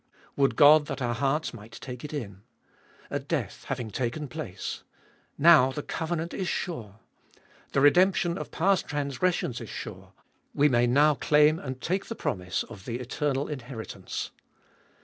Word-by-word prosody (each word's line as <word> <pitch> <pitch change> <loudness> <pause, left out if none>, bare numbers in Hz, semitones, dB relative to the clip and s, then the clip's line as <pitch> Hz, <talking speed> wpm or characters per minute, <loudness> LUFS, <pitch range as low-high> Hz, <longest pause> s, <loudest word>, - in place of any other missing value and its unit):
Would 135 -1 +2
God 150 0 +7
that 135 - -4
our 120 -2 0
hearts 140 +5 0
might 115 -1 -12
take 125 0 -8
it 150 - -6
in. 105 -10 -6 0.7
A - - 0
death - - -4
having 125 -5 -3
taken 130 +6 -2
place! 125 - -6 0.6
Now 150 -4 +7
the 150 +2 -5
covenant 165 +1 -3
is 190 - -2
sure. 115 - -4 0.8
The 135 - +3
redemption 175 +3 +4
of - - -5
past 190 +2 +1
transgressions 145 0 -1
is - - -8
sure; - - -8 0.4
we 145 +1 +5
may 120 -2 +3
now 145 +5 +5
claim 150 +2 +4
and 130 -4 -6
take 190 +6 -1
the 230 - -5
promise 95 - -2
of 100 -5 -12
the 120 - -3
eternal 140 +2 -1
inheritance. 125 -5 -6
140 Hz, 150 wpm, -27 LUFS, 120-155 Hz, 0.8 s, God